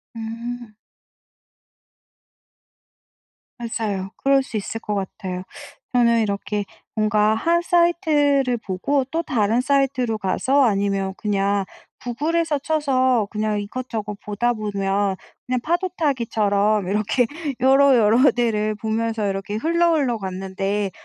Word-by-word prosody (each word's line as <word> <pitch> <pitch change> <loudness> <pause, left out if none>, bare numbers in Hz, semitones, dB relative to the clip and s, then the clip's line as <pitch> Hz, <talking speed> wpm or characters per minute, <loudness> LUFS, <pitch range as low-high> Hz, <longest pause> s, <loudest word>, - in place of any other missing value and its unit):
음. 230 +1 -6 2.8
맞아요. 215 -5 -3
그럴 275 0 +3
수 225 - -5
있을 215 +2 -4
것 210 -2 -3
같아요. 185 -1 -4 0.5
저는 235 -2 +4
이렇게 205 0 -2 0.3
뭔가 215 0 +2
1 335 +9 +2
사이트를 300 -7 +2
보고 230 +7 -1
또 330 +1 -1
다른 230 -6 +1
사이트로 265 -4 +1
가서 255 +8 +1
아니면 195 -3 0
그냥 200 -1 0 0.4
구글에서 300 +5 -1
쳐서 260 -7 +1
그냥 215 -1 -1
이것저것 210 -1 -5
보다 225 +4 0
보면 200 -2 -1 0.3
그냥 255 0 0
파도타기처럼 230 - 0
이렇게 215 +5 +1 0.3
여러, 270 0 +5
여러 230 +5 +5
데를 215 -3 0
보면서 220 0 -1
이렇게 195 +2 -4
흘러, 335 +7 +2
흘러 255 -7 +1
갔는데 195 +1 -3
225 Hz, 245 characters per minute, -22 LUFS, 205-270 Hz, 2.8 s, 여러